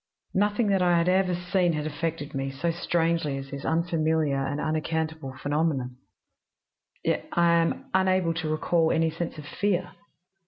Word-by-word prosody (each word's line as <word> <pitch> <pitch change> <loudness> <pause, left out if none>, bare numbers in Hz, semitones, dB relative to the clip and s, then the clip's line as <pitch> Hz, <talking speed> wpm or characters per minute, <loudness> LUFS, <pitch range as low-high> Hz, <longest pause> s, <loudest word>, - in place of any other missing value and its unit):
"Nothing 205 +3 +2
that 195 -2 +3
I 175 -1 +4
had 170 +1 +2
ever 185 0 +3
seen 180 0 +1
had 150 -1 -2
affected 155 -1 -3
me 135 0 -2
so 140 +5 -1
strangely 165 -3 0
as 135 0 -8
this 140 0 -6
unfamiliar 160 -4 +1
and 145 +2 -2
unaccountable 155 -3 -2
phenomenon, 145 -4 -1 1.1
yet - - -1
I 170 0 +4
am 165 0 +1
unable 185 -2 +2
to 165 -1 -3
recall 160 +1 +2
any 160 0 +2
sense 170 0 -4
of 150 - -8
fear. 185 +3 -1
165 Hz, 155 wpm, -27 LUFS, 150-175 Hz, 1.1 s, I